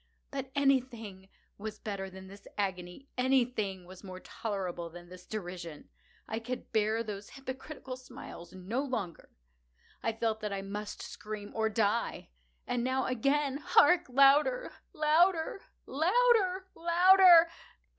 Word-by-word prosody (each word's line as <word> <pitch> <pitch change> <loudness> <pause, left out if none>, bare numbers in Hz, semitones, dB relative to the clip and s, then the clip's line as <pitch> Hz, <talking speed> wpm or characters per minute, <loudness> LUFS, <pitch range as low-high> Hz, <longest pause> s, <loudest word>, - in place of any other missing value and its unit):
But 270 -2 -4
anything 240 -9 0 0.3
was 215 +1 -6
better 195 -2 -5
than 190 0 -11
this 200 +1 -13
agony! 190 +4 -3
Anything 240 -8 +1
was 185 +2 -13
more 185 -1 -8
tolerable 185 -6 -4
than 175 +1 -12
this 180 0 -13
derision! 175 -6 -7 0.4
I 220 - -3
could 250 +2 -6
bear 220 +1 +2
those 205 -2 -7
hypocritical 265 0 -7
smiles 175 -9 -11
no 190 +7 -3
longer! 225 -11 -4 0.7
I 225 - -1
felt 225 -1 -1
that 210 -1 -4
I 195 -1 -3
must 205 +1 -6
scream 210 -1 -7
or 220 0 +1
die! 220 - 0 0.4
and 245 -1 -1
now—again!—hark! 275 +5 +2
louder! 285 - +4 0.2
louder! 325 +3 +2 0.2
louder! 380 - +2
louder! 345 0 +7
225 Hz, 120 wpm, -31 LUFS, 195-280 Hz, 0.7 s, louder